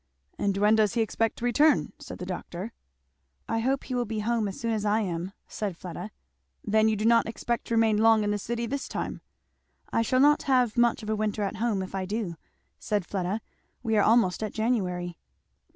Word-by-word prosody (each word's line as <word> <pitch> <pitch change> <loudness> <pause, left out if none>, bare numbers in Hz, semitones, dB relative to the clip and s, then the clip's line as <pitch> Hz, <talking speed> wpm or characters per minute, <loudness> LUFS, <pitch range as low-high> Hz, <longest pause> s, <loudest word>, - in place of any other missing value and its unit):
"And 200 -1 0
when 210 +2 +4
does 215 +1 +2
he 235 - +3
expect 225 0 0
to 240 - -4
return?" 290 +5 +3
said - - -8
the - - -6
doctor. 190 +7 -6 0.7
"I 225 - 0
hope 265 +4 0
he 255 - -6
will 245 -1 0
be 215 -1 -3
home 225 -1 0
as 195 - -6
soon 230 -1 -1
as 215 -2 -1
I 210 +1 +2
am," 180 -2 -3 0.2
said 200 -5 -4
Fleda. 180 +3 -7 0.6
"Then 220 0 +3
you 220 - +1
do 215 +1 -2
not 230 -1 +5
expect 235 +1 -3
to 230 - 0
remain 220 -2 +3
long 225 -1 +5
in 205 - 0
the 205 - -1
city 235 +3 -3
this 275 +4 -3
time?" - - -4 0.7
"I - - +3
shall 255 +3 +1
not 295 +2 +5
have 250 -5 +2
much 240 -1 +2
of 215 - -6
a - - +1
winter 215 0 -1
at 200 +2 -3
home 215 -3 0
if 185 - -9
I 190 -1 -2
do," 205 -4 -3 0.4
said 205 -4 -1
Fleda. 195 +3 -2 0.4
"We 225 -2 +1
are 210 - +5
almost 220 -5 +3
at 215 - -3
January." 180 -7 -1
220 Hz, 215 wpm, -27 LUFS, 205-235 Hz, 0.7 s, not